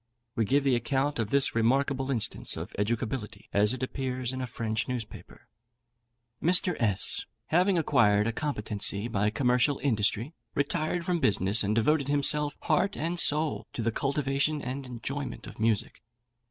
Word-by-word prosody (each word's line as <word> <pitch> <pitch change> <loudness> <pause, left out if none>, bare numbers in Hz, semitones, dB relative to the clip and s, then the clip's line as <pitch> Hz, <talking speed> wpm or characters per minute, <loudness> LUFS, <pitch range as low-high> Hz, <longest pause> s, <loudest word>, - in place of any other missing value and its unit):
We 115 - +1
give 140 +7 +2
the 135 -3 +3
account 135 +3 -1
of 110 -2 -1
this 140 +2 +2
remarkable 135 +4 +1
instance 125 -6 -1
of - - -7
educability 110 0 -3
as 105 +1 +4
it 130 0 -3
appears 130 -1 -3
in 130 - -4
a 130 - -3
French 110 -2 -3
newspaper. 120 -4 -7 0.9
Mr. 180 +1 +4
S, 105 -5 +1 0.2
having 180 +3 +3
acquired 110 -10 +3
a 115 - 0
competency 105 -6 -1
by 105 -2 0
commercial 125 +4 +2
industry, 115 +1 0 0.2
retired 165 +3 -1
from 180 -2 0
business, 100 - +2
and 105 +2 0
devoted 140 +5 +2
himself, 145 +1 +1
heart 200 - +1
and 170 +3 -2
soul, 155 0 +2
to 115 - -3
the 115 - +1
cultivation 140 +3 0
and 130 0 -5
enjoyment 135 +3 -5
of - - -11
music. 110 -2 0
130 Hz, 155 wpm, -28 LUFS, 110-145 Hz, 0.9 s, as